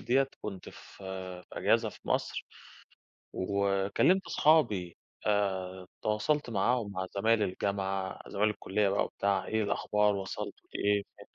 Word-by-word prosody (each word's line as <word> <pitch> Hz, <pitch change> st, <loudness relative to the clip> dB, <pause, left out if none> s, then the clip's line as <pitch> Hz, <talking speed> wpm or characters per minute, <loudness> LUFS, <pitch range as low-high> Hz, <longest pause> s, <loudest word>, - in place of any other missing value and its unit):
دِيّة 135 Hz, +2 st, +2 dB
كنت 100 Hz, -3 st, -6 dB
في -, -, -11 dB, 0.7 s
في -, -, -25 dB
إجازة -, -, +2 dB
في -, -, -13 dB
مصر -, -, -1 dB, 0.9 s
وكلّمت 100 Hz, -, +2 dB
أصحابي 110 Hz, -, +3 dB, 0.3 s
آآ، 95 Hz, -3 st, 0 dB
تواصلت 120 Hz, +6 st, +1 dB
معاهم 110 Hz, +1 st, +1 dB
مع 95 Hz, -1 st, -3 dB
زمايل 110 Hz, +1 st, +3 dB
الجامعة، 95 Hz, 0 st, -2 dB
زمايل 105 Hz, +1 st, +1 dB
الكُلّية 105 Hz, -1 st, 0 dB
بقى 100 Hz, -, +2 dB
وبتاع، 100 Hz, -2 st, 0 dB
إيه 110 Hz, -1 st, 0 dB
الأخبار، 105 Hz, 0 st, +2 dB
وصَلتوا 95 Hz, -1 st, -5 dB
لإيه؟ 100 Hz, 0 st, +2 dB
ف -, -, -20 dB
100 Hz, 125 wpm, -31 LUFS, 95-110 Hz, 0.9 s, أصحابي